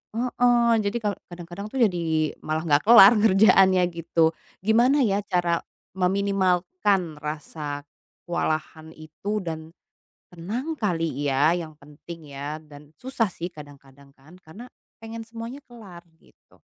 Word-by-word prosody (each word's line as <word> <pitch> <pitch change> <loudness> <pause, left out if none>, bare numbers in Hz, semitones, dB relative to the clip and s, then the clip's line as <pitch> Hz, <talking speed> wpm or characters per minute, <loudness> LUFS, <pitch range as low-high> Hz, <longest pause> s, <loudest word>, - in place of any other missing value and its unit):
heeh, 240 0 +2
jadi 200 +3 -1
ka 210 -2 -1 0.2
kadang-kadang 175 +4 -8
tuh - - -11
jadi 160 -4 -1
malah 155 +1 -2
nggak 145 0 +3
kelar 230 -1 +9
kerjaannya 195 -3 +5
gitu. 165 -1 +1 0.3
Gimana 240 +7 +3
ya 200 0 +1
cara 175 -2 +1 0.4
meminimalkan 190 - 0
rasa 150 -1 -6 0.4
kewalahan 160 -1 -3
itu 160 +7 -5
dan 160 -1 -6 0.6
tenang 225 - -5
kali 165 -8 -2
ya, 140 +4 +3
yang 160 -3 -8
penting 150 +1 -12
ya 145 +2 -5
dan 150 -1 -15
susah 255 -3 -1
sih 170 - -6
kadang-kadang 140 -3 -15
kan, 155 +7 -18
karena 205 +10 -12 0.4
pengen 225 0 -7
semuanya 230 +3 -8
kelar 200 -8 -13 0.2
gitu. - - -27
175 Hz, 125 wpm, -24 LUFS, 155-210 Hz, 0.6 s, kelar